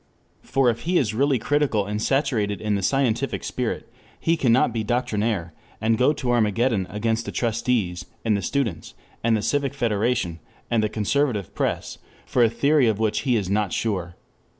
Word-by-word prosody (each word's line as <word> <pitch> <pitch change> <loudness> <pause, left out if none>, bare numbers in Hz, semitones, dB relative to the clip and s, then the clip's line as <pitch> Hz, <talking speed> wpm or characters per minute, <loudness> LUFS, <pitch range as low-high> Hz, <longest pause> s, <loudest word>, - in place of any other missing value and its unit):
For 130 -2 +2
if 115 - -6
he 175 +2 0
is 110 -9 +1
really 135 +3 +2
critical 135 -4 +1
and 105 +1 -3
saturated 115 -7 0
in 105 -1 -1
the 100 - 0
scientific 135 +3 0
spirit, 125 -3 -3 0.3
he 165 - +2
cannot 125 -5 +3
be 115 -2 -1
doctrinaire, 110 -7 -1 0.3
and 110 +1 +2
go 125 +5 +4
to 130 -5 -2
Armageddon 115 -3 +1
against 115 +2 -1
the - - -3
trustees 110 -6 -1 0.2
and 110 -2 +3
the 100 - -1
students 110 - -2 0.3
and 115 -1 +3
the 105 - -4
Civic 140 -1 0
Federation 110 -7 0 0.3
and 115 -2 +3
the 110 - 0
conservative 110 -1 0
press - - -2 0.3
for 125 - +2
a 115 - +5
theory 140 +3 +3
of 110 -3 +1
which 110 -1 0
he 125 - +4
is 100 -5 0
not 100 -1 0
sure. 90 -6 -2
115 Hz, 175 wpm, -24 LUFS, 105-130 Hz, 0.3 s, a